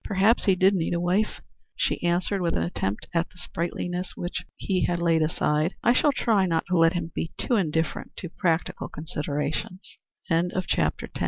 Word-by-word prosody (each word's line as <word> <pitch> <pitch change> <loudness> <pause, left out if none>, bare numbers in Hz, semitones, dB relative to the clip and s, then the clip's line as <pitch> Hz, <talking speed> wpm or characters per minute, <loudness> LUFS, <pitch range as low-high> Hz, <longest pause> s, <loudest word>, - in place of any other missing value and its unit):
"Perhaps 200 +4 +3
he 195 - +5
did 190 +2 +4
need 175 -2 0
a - - 0
wife," 185 +5 0 0.3
she - - 0
answered 175 +3 +1
with 170 -1 +1
an 80 - +1
attempt 95 +4 -2
at 165 0 +1
the - - -22
sprightliness 175 +1 -3
which 175 - -4
he 185 -2 0
had 175 - 0
laid 165 -1 +2
aside. 155 +1 +1
"I 240 - +5
shall 290 +3 +4
try 215 -8 +2
not 165 -2 0
to 180 - +2
let 165 +1 +5
him 170 -2 -3
be 165 - -3
too 245 - +1
indifferent 160 -5 -1
to 175 - -4
practical 170 -1 -1
considerations." 150 +3 -4 0.3
CHAPTER 165 -3 +2
III. 175 +1 0
"Who - - -4
is - - -15
Dr. - - 0
Page?" - - -28
175 Hz, 200 wpm, -26 LUFS, 165-185 Hz, 0.3 s, he